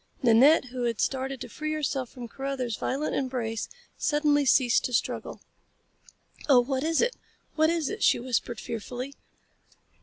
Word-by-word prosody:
Nanette, 255 +6 +6
who 250 -1 -2
had 230 -2 -1
started 265 0 -1
to - - -5
free 310 +6 -4
herself 270 -4 -2
from 245 -3 -9
Carruthers 265 -2 -3
violent 280 +8 -2
embrace, 245 -5 -2 0.3
suddenly 295 -1 +2
ceased 245 -2 +4
to 250 - -3
struggle. - - -2 1.1
"Oh, 265 -3 +8
what 265 +2 -2
is 325 +1 +2
it? 485 +1 +1 0.4
What 315 0 +3
is 330 -3 0
it?" - - -5
she - - +4
whispered 240 -2 -2
fearfully. 245 +4 -6
265 Hz, 150 wpm, -27 LUFS, 240-290 Hz, 1.1 s, Oh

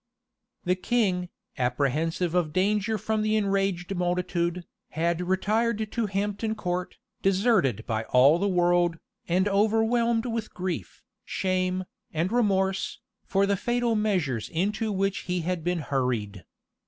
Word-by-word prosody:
The 180 - +2
king, 185 -2 0 0.3
apprehensive 150 +7 0
of 175 -4 +1
danger 210 +3 +1
from 215 +2 -1
the 215 0 +1
enraged 195 -3 0
multitude, 175 -1 -1 0.2
had 170 +2 0
retired 215 +4 0
to 230 -3 -1
Hampton 205 +3 -2
Court, 180 -2 -3 0.2
deserted 190 - +2
by 110 -2 -2
all 135 +8 +5
the 200 - +1
world, 175 -2 +2 0.3
and 185 +3 +2
overwhelmed 225 +3 +2
with 230 -2 -4
grief, 175 - -4 0.2
shame, 185 0 -1 0.3
and 165 +4 -1
remorse, 195 -5 +1 0.3
for 195 0 +2
the 200 0 +2
fatal 240 +3 0
measures 180 - 0
into 210 +6 -1
which 195 0 0
he 180 -1 0
had 175 0 -2
been 175 -1 0
hurried. 120 - -2
185 Hz, 130 wpm, -27 LUFS, 170-210 Hz, 0.3 s, all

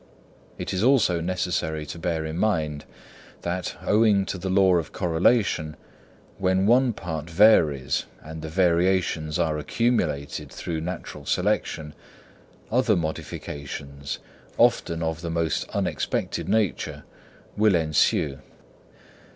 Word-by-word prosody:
It - - -4
is 95 - 0
also 110 -9 +3
necessary 85 -3 -2
to 80 +3 -7
bear 80 -1 -1
in 80 0 -4
mind 80 -9 0 0.6
that, 90 +1 -3
owing 105 -2 +4
to 95 - -4
the 95 +2 -3
law 95 -1 +4
of 80 -3 -3
correlation, 85 -2 +1 0.6
when 95 0 +2
one 125 +3 +4
part 80 -6 -5
varies 80 -8 +4 0.2
and 80 +1 -8
the 80 - -5
variations 85 -2 +1
are 80 -3 0
accumulated 75 - -1
through 80 -2 -4
natural 90 +3 -6
selection, 75 -1 -1 0.8
other 120 -2 +3
modifications, 70 -3 -5 0.4
often 85 0 +2
of 80 0 -2
the 85 - -4
most 80 -2 -1
unexpected - - -2
nature, 110 -5 0 0.5
will 105 -2 +4
ensue. 75 -3 +2
85 Hz, 115 wpm, -25 LUFS, 80-95 Hz, 0.8 s, owing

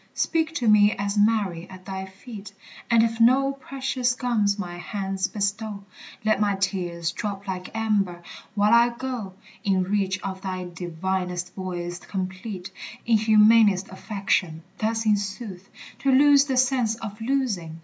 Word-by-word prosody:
Speak 325 -1 0
to 245 -7 0
me 210 0 +6
as 200 +1 -2
Mary 205 -5 +1
at 185 -1 -12
thy 190 -1 -5
feet 200 +1 -10 0.4
And 230 -1 +5
if 230 0 -1
no 265 +4 +5
precious 265 -2 -2
gums 220 -6 +1
my 175 -3 -5
hands 195 0 -2
bestow, 205 0 -3 0.4
Let 215 -2 +3
my 205 -2 +2
tears 175 -3 -2
drop 200 +1 -5
like 185 -1 -4
amber, 200 -6 0 0.3
while 210 +2 +3
I 235 0 +5
go 245 -7 -5 0.3
In 190 -2 +2
reach 190 -1 0
of 190 -1 -5
thy 185 -2 -4
divinest 180 +1 -3
voice 175 -2 -5
complete 190 0 -5 0.3
In 225 -2 +4
humanest 215 -2 +5
affection 190 -5 -2 0.2
thus 225 +1 0
in 210 -1 +4
sooth, 195 -2 -6 0.3
To 275 - +2
lose 280 +1 +6
the 265 -3 -1
sense 250 -3 +2
of 220 -1 -8
losing! 225 -11 -1
205 Hz, 150 wpm, -25 LUFS, 185-230 Hz, 0.4 s, me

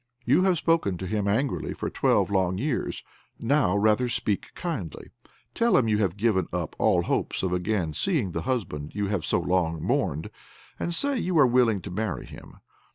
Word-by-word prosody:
You 140 +8 +4
have 185 -2 +3
spoken 160 - +1
to 95 - -5
him 100 +2 -1
angrily 125 +7 -1
for - - -4
twelve - - +2
long 95 -2 +1
years; 135 +4 -2 0.3
now 115 -6 +2
rather 110 +4 +2
speak 115 -3 -1
kindly. 150 - -5 0.4
Tell 235 0 +3
him 120 - +2
you 105 -1 +2
have 100 -3 0
given 100 -5 +1
up 85 -3 -3
all - - +3
hopes - - -1
of 90 -1 0
again 90 -3 -1
seeing 150 - 0
the - - -3
husband 95 - -3
you 100 -1 -1
have 100 -5 -1
so - - +1
long 85 -3 0
mourned, 95 - -1 0.5
and 175 - -2
say 275 +9 +1
you 180 -4 0
are 145 - +7
willing 120 -5 +3
to 100 - -8
marry 105 0 -3
him. - - -12
105 Hz, 185 wpm, -26 LUFS, 90-135 Hz, 0.5 s, are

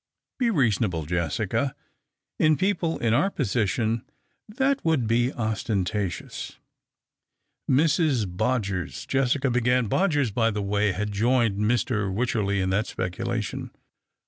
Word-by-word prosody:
" - - -63
Be 245 -2 +2
reasonable, 110 - +1
Jessica. 85 -2 -1 0.6
In 155 -1 +4
people 185 -4 0
in 115 -1 +1
our 150 +11 +3
position 110 - 0 0.5
that 265 +5 0
would 160 -7 +2
be 120 +3 +2
ostentatious 105 -5 -3 0.3
" - - -62
" - - -24
Mrs. 145 - +3
Bodgers," 100 -2 -2
Jessica 135 0 +1
began. 125 0 +2
Bodgers, 145 - +1
by 115 0 +2
the 105 -2 -2
way, 105 +1 +1
had 105 +3 -3
joined 115 0 +2
Mr. 110 -2 +1
Wycherley 100 -2 0
in 95 0 0
that 105 +4 +1
speculation. 110 +4 -3
115 Hz, 125 wpm, -25 LUFS, 100-130 Hz, 0.6 s, In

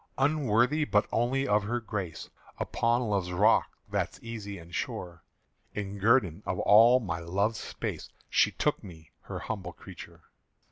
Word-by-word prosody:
"_Unworthy 135 0 +2
but 105 0 +3
only 130 +4 +1
of 105 +1 +3
her 120 +3 -1
grace, 100 -7 -5 0.3
Upon 120 +1 +1
Love's 100 -5 -1
rock 105 +5 +3
that's - - -2
easy 105 -4 -6
and 85 0 -13
sure, 85 -1 -4 0.5
In 100 -1 -4
guerdon 100 -5 +3
of 90 -1 -3
all 115 +4 +7
my 90 -8 -3
love's 100 +7 -1
space - - -5 0.2
She - - +3
took - - -1
me 80 -4 -12
her - - -5
humble 95 -5 -5
creäture. - - -12
105 Hz, 145 wpm, -29 LUFS, 90-120 Hz, 0.5 s, all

